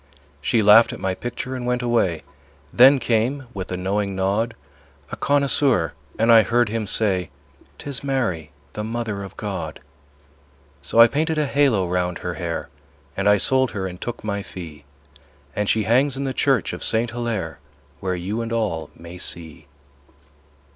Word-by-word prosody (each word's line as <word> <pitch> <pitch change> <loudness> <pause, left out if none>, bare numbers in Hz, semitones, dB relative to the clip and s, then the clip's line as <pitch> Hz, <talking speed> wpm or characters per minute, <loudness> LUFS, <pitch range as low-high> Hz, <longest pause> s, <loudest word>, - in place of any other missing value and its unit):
She 115 -2 +2
laughed 105 +3 +7
at - - -8
my 95 -1 -1
picture 120 +5 -5
and 125 - -5
went 125 0 0
away. 95 - +1 0.5
Then 135 +3 +7
came, 125 +3 0
with 95 -2 -6
a 90 - -2
knowing 100 +1 -1
nod, 100 +5 0 0.6
A - - -3
connoisseur, 140 - +2 0.2
and 115 +1 +4
I 115 -1 +9
heard 120 0 +2
him 110 -1 -2
say; 95 -5 +1 0.5
"'Tis 140 -2 -5
Mary, 115 - -1 0.2
the 105 - -4
Mother 110 -2 -3
of 95 -2 -9
God." - - -5 1.0
So 70 +11 0
I 115 - +11
painted 155 +5 -1
a 150 - +2
halo 135 -10 +2
round 90 0 -1
her 90 - -4
hair, 85 -5 -4 0.5
And 100 +1 +2
I 105 - +6
sold 130 +5 +2
her 95 - -2
and 90 -1 -7
took 120 - -5
my 100 -1 -2
fee, 80 -7 -10 0.7
And 105 -1 0
she 110 - +2
hangs 130 +6 +2
in 140 - -2
the 135 -1 -2
church - - +1
of - - -6
Saint 115 +1 +1
Hillaire, 110 -10 -3 0.4
Where 95 -1 -2
you 100 +6 -3
and 115 0 -4
all 100 -10 -1
may 85 +2 -11
see. 80 -5 -5
110 Hz, 170 wpm, -22 LUFS, 90-120 Hz, 1.0 s, I